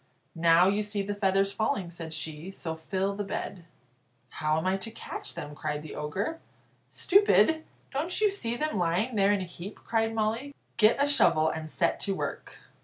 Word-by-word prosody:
"Now 170 +2 +5
you 200 +2 +2
see 205 -1 -2
the 205 +1 -2
feathers 195 -1 +2
falling," 200 -4 -1
said 165 -2 -7
she, 155 +2 -5
"so 165 -4 -5
fill 190 +5 -2
the 205 - -2
bed." 195 -3 -5 0.6
"How 155 +3 0
am 160 - -2
I 190 +1 +2
to 210 +4 -6
catch 225 - -7
them?" 150 0 -6
cried 150 0 -3
the 155 - -8
Ogre. 195 - -3 0.5
"Stupid! 320 - +4 0.3
don't 310 +6 -1
you 430 - +5
see 240 -12 -3
them 305 -8 -1
lying 180 +8 +1
there 200 -1 +4
in 205 -2 +1
a - - -3
heap?" 180 +3 -8
cried 225 -1 +1
Molly; 225 +6 -1 0.2
"get 215 0 +5
a 285 - +4
shovel, 160 - +4
and 160 0 -5
set 170 +2 +1
to 195 -1 -1
work." - - -5
195 Hz, 185 wpm, -28 LUFS, 165-225 Hz, 0.6 s, Now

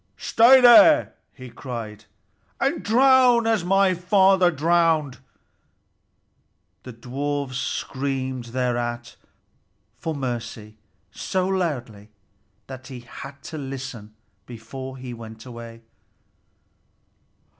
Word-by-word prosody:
"Stay 245 +4 +5
there," 250 +6 +7 0.2
he 130 -3 -12
cried, 115 -5 -8 0.5
"and - - 0
drown 250 0 +4
as 225 -5 +1
my 195 +1 +3
father 185 0 +3
drowned!" 160 -4 +1 1.6
The 125 - -10
dwarfs 135 +3 -4
screamed 130 -2 -4
thereat 120 -1 -3 0.8
for 160 -1 -4
mercy 120 -5 -6 0.4
so 185 -1 -2
loudly 125 - -3 0.6
that 130 -1 -10
he 130 -3 -9
had 135 +3 -11
to 155 - -7
listen 130 -6 -8 0.3
before 130 +3 -9
he 125 -1 -8
went 110 0 -11
away. 115 -2 -11
135 Hz, 90 wpm, -23 LUFS, 120-175 Hz, 1.6 s, there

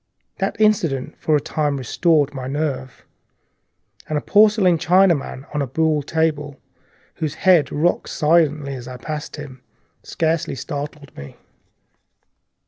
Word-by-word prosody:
That - - -2
incident 165 -10 +1
for 155 - +1
a - - +3
time 145 0 -1
restored 145 +3 +1
my 130 -2 -5
nerve, 135 -3 -4 1.0
and 155 - 0
a - - +1
dim - - -27
porcelain 205 -5 +4
Chinaman 175 -6 +2
on 150 - -1
a 140 - -1
buhl 155 +3 +1
table, 150 -1 -1 0.6
whose 155 -3 -3
head 175 -7 +3
rocked 165 +4 0
as 150 -6 +1
I 130 -1 -7
passed, 150 +3 -6 0.6
scarcely 165 -2 -1
startled 145 +2 -7
me. 70 0 -10
150 Hz, 125 wpm, -21 LUFS, 140-165 Hz, 1.0 s, porcelain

